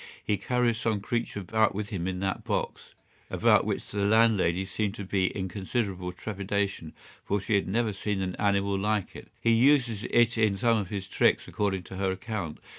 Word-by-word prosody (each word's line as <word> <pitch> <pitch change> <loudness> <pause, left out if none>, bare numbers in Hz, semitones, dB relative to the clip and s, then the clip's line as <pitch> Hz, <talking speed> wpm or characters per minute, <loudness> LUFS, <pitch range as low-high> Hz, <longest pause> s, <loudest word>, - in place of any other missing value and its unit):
He 105 - +2
carries 120 +3 0
some 110 -2 0
creature 115 0 -3
about 110 +2 +1
with 105 +1 -3
him 95 -5 -3
in 90 -1 -3
that 95 -1 -2
box; - - -3 0.3
about - - +4
which - - -2
the 100 -1 -1
landlady 100 -4 +3
seemed 100 +1 -2
to 100 - -6
be 95 0 0
in 95 -1 -2
considerable 95 -2 -3
trepidation, 100 -3 -3 0.3
for 100 - 0
she 105 +3 -2
had 100 - +2
never 110 +2 0
seen 100 0 -2
an 90 -1 -3
animal 100 -1 +1
like 105 0 -1
it. - - -10
He 115 - +2
uses 120 -3 +3
it 120 -1 +3
in 105 -3 +3
some 115 +2 +3
of 100 -4 -4
his 100 -2 -4
tricks - - +2
according 95 -3 -1
to 95 - -9
her 95 0 0
account. 95 -4 -4
100 Hz, 190 wpm, -28 LUFS, 95-110 Hz, 0.3 s, about